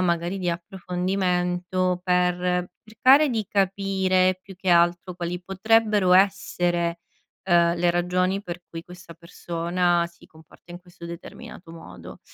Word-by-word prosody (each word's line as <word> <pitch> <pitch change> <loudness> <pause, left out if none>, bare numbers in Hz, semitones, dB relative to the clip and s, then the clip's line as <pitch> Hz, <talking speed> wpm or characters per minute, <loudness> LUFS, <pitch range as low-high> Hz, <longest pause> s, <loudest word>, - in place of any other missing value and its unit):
magari 175 +1 -1
di 180 -2 -2
approfondimento, 180 0 -2
per 180 0 0
cercare 265 +7 +4
di 225 -3 -1
capire 190 -2 +1
più 195 +1 -13
che 190 0 -5
altro 175 +1 +2
quali 175 0 -4
potrebbero 205 0 +2
essere, 175 -3 +1 0.4
ehm, 170 -2 +3
le 175 0 +2
ragioni 180 +2 0
per 175 0 -7
cui 165 0 -8
questa 175 -1 -13
persona 170 +1 -1
si 170 0 -21
comporta 160 +2 -20
in 175 - -8
questo 175 -1 -15
determinato 170 0 -10
modo. 165 -1 -12
180 Hz, 125 wpm, -24 LUFS, 175-190 Hz, 0.4 s, cercare